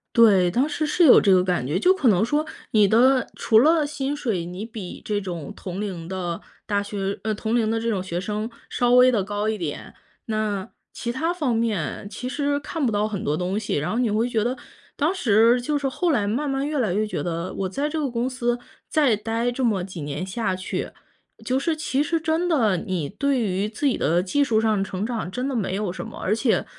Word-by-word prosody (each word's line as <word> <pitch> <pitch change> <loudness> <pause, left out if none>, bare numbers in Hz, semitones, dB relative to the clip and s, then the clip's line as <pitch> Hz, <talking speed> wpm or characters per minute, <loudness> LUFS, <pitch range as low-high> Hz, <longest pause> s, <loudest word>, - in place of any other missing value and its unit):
对， 200 -7 +6
当 255 +9 +2
时 310 0 -2
是 345 +4 +2
有 260 - +8
这 200 - +4
个 180 -1 +5
感 180 -8 0
觉。 145 - 0
就 365 +1 +5
可 340 -9 0
能 195 -1 +3
说 295 +6 +1 0.3
你 210 -2 +5
的 250 +4 +4
除 220 - +4
了 310 +4 +4
薪 285 -1 -3
水， 220 -12 -2
你 180 +5 -6
比 220 -6 -8
这 205 -1 -1
种 170 -6 -6
同 185 0 -6
龄 185 -6 -4
的 180 -2 -4 0.2
大 205 -1 0
学 200 -1 -3
呃， 215 0 0
同 220 +2 -2
龄 225 -2 +2
的 225 - 0
这 230 +1 -1
种 195 -5 -1
学 175 -2 -3
生 210 +3 -3 0.2
稍 245 0 +1
微 250 +1 +7
地 215 -5 +1
高 205 +2 -2
一 220 0 0
点， 165 -6 -5 0.3
那 215 -2 -2 0.2
其 235 - -4
它 325 +7 0
方 290 -9 0
面 205 -7 -1
其 245 +5 -6
实 285 +2 0
看 295 0 -3
不 235 - +1
到 210 0 +1
很 205 -3 -4
多 150 +1 0
东 185 +3 -1
西， 215 -1 -1
然 145 +1 -1
后 230 - -1
你 240 -4 +1
会 220 +3 +1
觉 225 -3 0
得 250 +3 -1 0.4
当 310 +6 +1
时 235 - +4
就 295 +4 0
是 280 -1 -1
后 335 +6 0
来 215 -8 +1
慢 270 +8 -1
慢 270 +1 -1
越 300 0 -2
来 215 -8 +1
越 215 +2 0
觉 - - -3
得 170 +1 -3
我 190 -1 -2
在 280 +10 -1
这 310 +2 -3
个 295 -3 -1
公 240 +1 -1
司 240 -2 -1 0.3
再 290 -8 +3
待 225 +3 -1
这 245 +2 -3
么 215 -6 +2
几 180 -2 -7
年 145 +4 -4
下 190 0 -2
去， 185 0 -4 0.5
就 255 - +1
是 300 +5 0
其 295 -2 0
实 330 +2 0
真 325 +2 0
的， 230 - +3
你 180 -4 -2
对 275 - 0
于 200 -2 -1
自 225 +7 -4
己 260 - +1
的 170 +4 +2
技 200 +11 +1
术 225 -5 +2
上 215 -3 +1
成 195 0 -3
长 225 -6 -3
真 250 +6 -2
的 275 - -2
没 195 -5 -1
有 205 -2 -2
什 - - -6
么。 - - -9
而 205 - 0
且 230 0 +1
220 Hz, 255 characters per minute, -24 LUFS, 195-260 Hz, 0.5 s, 有